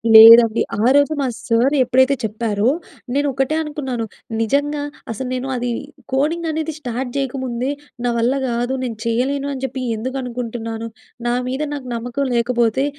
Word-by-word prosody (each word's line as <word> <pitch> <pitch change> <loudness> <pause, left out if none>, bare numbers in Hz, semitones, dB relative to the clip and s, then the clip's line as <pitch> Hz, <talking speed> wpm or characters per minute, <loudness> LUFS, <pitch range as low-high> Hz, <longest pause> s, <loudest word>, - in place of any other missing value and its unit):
లేదండి. 230 0 +10 0.2
ఆ - - +3
రోజు 285 +2 +4
మా 270 - +1 0.2
సార్ 240 +5 +3
ఎప్పుడైతే 260 +2 +3
చెప్పారో, 215 0 0 0.5
నేను 285 +1 +1
ఒకటే 270 +4 0
అనుకున్నాను. 265 -7 -3 0.4
నిజంగా 285 +5 0 0.3
అసలు, 255 +4 -4
"నేను 255 +1 -3
అది 245 0 -2 0.4
కోడింగ్ 315 +5 +1
అనేది 315 0 -2
స్టార్ట్ 250 -2 -4
చేయగముందే 260 -1 -2 0.3
నా - - +2
వల్ల 235 +3 +2
గాదు, 245 +2 -1
నేను 235 -3 -4
చేయ్యలేను" 270 +5 0
అని 265 -1 -6
చెప్పి 260 0 -4
ఎందుకు 255 +5 -4
అనుకుంటున్నాను? 230 -2 -4 0.4
నా 240 - +2
మీద 265 +3 -2
నాకు 270 -3 -6
నమ్మకం 245 +4 -2
లేకపోతే 235 +1 +2
250 Hz, 150 wpm, -20 LUFS, 235-275 Hz, 0.5 s, లేదండి